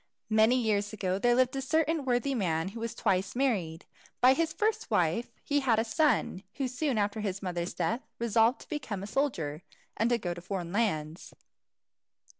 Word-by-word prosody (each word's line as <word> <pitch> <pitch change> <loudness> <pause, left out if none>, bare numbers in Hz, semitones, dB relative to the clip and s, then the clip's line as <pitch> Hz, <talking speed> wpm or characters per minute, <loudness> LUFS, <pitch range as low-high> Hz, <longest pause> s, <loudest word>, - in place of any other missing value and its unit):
Many 220 +3 +5
years 205 -3 0
ago, 190 -2 -1
there 240 +3 +3
lived 255 +1 +2
a 270 - -1
certain 315 +1 +1
worthy 250 +2 +1
man 170 -7 0
who 225 +4 -8
was 230 0 -4
twice 190 +2 0
married. 195 -12 -1 0.3
By 255 +1 +7
his 325 +3 0
first 440 +4 -1
wife 195 +2 +1
he 290 0 +1
had 250 -5 +2
a 225 - +3
son, 230 -4 +1
who 270 -2 -1
soon 255 0 -1
after 205 +1 0
his 200 -2 -3
mother's 175 -1 -3
death 215 +9 -1 0.2
resolved 230 +2 +2
to - - -14
become 220 -11 -4
a - - -4
soldier, 190 - -1 0.3
and 235 +2 +1
go 175 -4 -3
to 175 - -9
foreign 180 -2 -4
lands. 165 -8 -2
225 Hz, 180 wpm, -30 LUFS, 185-260 Hz, 0.3 s, By